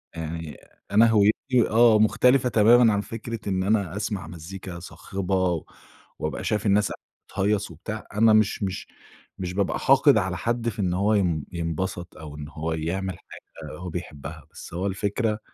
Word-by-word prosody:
يعني 80 -1 -6 0.3
أنا 110 +3 +6
هويتي 110 +4 +3
آه 115 -1 +5
مختلفة 125 +4 +4
تمامًا 115 +1 +5
عن 100 - 0
فكرة 115 0 -6
إن 95 -1 0
أنا 100 -4 0
أسمع 100 -4 -3
مزيكا 85 +2 -8
صاخبة 95 -1 -2 0.6
وابقى - - -3
شايف 105 0 -1
الناس 105 0 +3
قاعدة - - -8 0.3
بتهيَّص 100 -1 0
وبتاع، 105 +7 -7
أنا 110 +1 +5
مش 110 -1 +2
مش 95 -2 -4 0.5
مش 90 -1 -4
بابقى 100 +1 0
حاقد 135 -1 +5
على 95 -3 -1
حد 120 +3 -1
في 110 0 -9
إن 90 -3 0
هو 100 +4 +2
ين 85 -8 +1
ينبسط 85 +1 -4
أو 75 -2 -9
إن 75 -1 -7
هو 80 +1 -3
يعمل 90 +3 -3
حاجة - - -12
هو 90 +1 -6
بيحبها، 80 -4 -7
بس - - -11
هو 90 +3 -2
الفكرة 105 +3 -1
100 Hz, 160 wpm, -25 LUFS, 85-110 Hz, 0.6 s, أنا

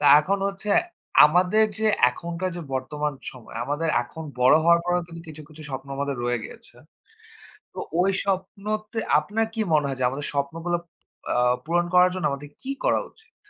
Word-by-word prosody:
তা 145 - +2
এখন 195 +5 0
হচ্ছে 200 +1 -3 0.5
আমাদের 180 +7 +4
যে 220 - +1 0.2
এখনকার 170 +6 -4
যে 175 - -5
বর্তমান 150 +3 -2 0.2
সময় 120 -3 -12
আমাদের 150 +4 -1
এখন 160 +7 -9 0.2
বড় 125 - +6
হওয়ার 170 0 +5
পরেও 175 -1 0
কিন্তু 165 -1 -10
কিছু, 155 0 -8
কিছু 155 0 -11
স্বপ্ন 135 -1 -6
আমাদের 140 -1 -2
রয়ে 120 0 0
গিয়েছে। - - -10 1.0
তো - - -10 0.2
ওই 195 +2 +3
স্বপ্নতে 210 +3 -3 0.2
আপনার 210 +9 -1
কি 225 - -2
মনে 150 -2 +3
হয় 135 -1 -3
যে 125 - +3
আমাদের 140 +3 -3
স্বপ্নগুলো 165 +5 -1 0.6
আ - - +1 0.3
পূরণ 175 +1 +1
করার 180 0 +6
জন্য 185 - -4
আমাদের 140 +1 -5
কি 270 - -5
করা - - +3
উচিত? 445 - -20
165 Hz, 175 wpm, -24 LUFS, 145-185 Hz, 1.0 s, বড়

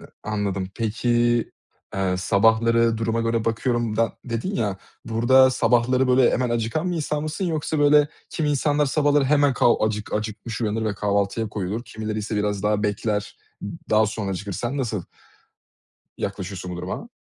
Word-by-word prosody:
Hıh. - - -12 0.2
Anladım. 100 -3 -2
Peki, 115 +1 -2 0.9
eee, 95 -1 0
sabahları 110 +4 +3
duruma 115 0 0
göre 115 -1 0
bakıyorum 115 -1 0
da 115 0 +1
dedin 120 - -3
ya, 105 - -1 0.3
burada, 130 +4 +5
sabahları, 125 +1 +2
böyle, 125 0 +5
hemen 125 -1 0
acıkan 120 +10 -1
bir 175 - -2
insan 150 -1 -2
mısın 155 +5 -3
yoksa, 155 -2 -1
böyle, 145 0 +5 0.2
kimi 155 -3 -1
insanlar 145 +1 +1
sabahları 145 0 +2
hemen 145 0 +3
kav 120 -1 +3
acık 110 -1 -1
acıkmış 110 +1 -4
uyanır 110 0 -1
ve 105 -2 -1
kahvaltıya 100 +2 0
koyulur. 105 +2 -3
Kimileri 110 -1 -5
ise 105 +1 -3
biraz 105 -1 -1
daha 105 0 +1
bekler, 105 0 -2 0.5
daha 110 0 +4
sonra 105 -2 -3
acıkır. 100 +2 -4
Sen 120 +8 -3
nasıl 115 -8 -2 1.2
yaklaşıyorsun 95 -2 -5
bu 90 - -5
duruma? 90 +1 -5
115 Hz, 155 wpm, -23 LUFS, 105-130 Hz, 1.2 s, burada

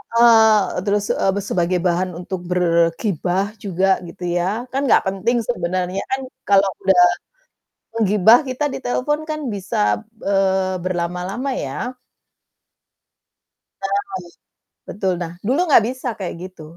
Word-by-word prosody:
Heeh, 220 -5 +5
terus, 205 0 +1
eee, 195 +1 0
sebagai 180 0 +1
bahan 180 +1 0
untuk 180 +1 -5
bergibah 175 +1 +1 0.2
juga, 190 -1 0 0.2
gitu 180 +2 -11
ya, 195 +7 -1
kan 270 - -1
nggak - - +5
penting 195 +6 0
sebenarnya 185 -3 -2
kan, 265 0 0 0.3
kalau 200 -1 +4
udah 190 -2 +5 0.9
menggibah, 215 +1 +5
kita 255 +3 -3
ditelepon 265 +4 -1
kan, 305 0 -2
bisa, 105 - -1 0.2
eee, 190 -1 +1
berlama-lama 180 +7 -3
ya. 245 - -4 1.8
Nah, - - -1 0.9
betul, 190 -2 -1
nah, 165 -1 -5
dulu 265 +8 +2
nggak 255 -7 +6
bisa 255 0 -8
kayak 185 -3 -4
gitu, 185 -3 -10
195 Hz, 120 wpm, -20 LUFS, 180-225 Hz, 1.8 s, nggak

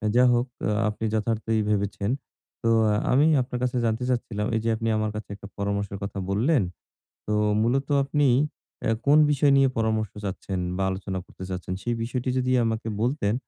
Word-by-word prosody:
যা 125 - +6
হোক, 120 +2 +1 0.2
আ - - +2 0.2
আপনি 105 +1 -4
যথার্থই 110 0 0
ভেবেছেন। 100 0 0 0.5
তো, 115 - +2 0.4
আমি 140 +4 +5 0.2
আপনার 125 0 -4
কাছে 125 0 0
জানতে 115 +2 0
চাচ্ছিলাম, 110 -4 -1
এই 110 - +2
যে 115 - +1
আপনি 115 0 -3
আমার 110 0 -1
কাছে, 105 - -6
একটা 100 - -11
পরামর্শের 100 0 -2
কথা 100 0 -4
বললেন। 120 +6 +2 0.6
তো 105 - 0 0.3
মূলত 135 +5 +1 0.2
আপনি, 145 +1 +2 0.6
এ - - +1 0.2
কোন 145 +2 +6
বিষয় 145 0 +3
নিয়ে 135 -1 +5
পরামর্শ 110 -2 0
চাচ্ছেন 95 -1 -4 0.2
বা 95 - 0
আলোচনা 95 0 -3
করতে 95 - -11
চাচ্ছেন? 90 0 -4
সেই 120 -1 -1
বিষয়টি 125 +2 -2
যদি 130 0 +1
আমাকে 110 0 -2
বলতেন, 120 -4 +1
110 Hz, 175 wpm, -25 LUFS, 100-125 Hz, 0.6 s, যা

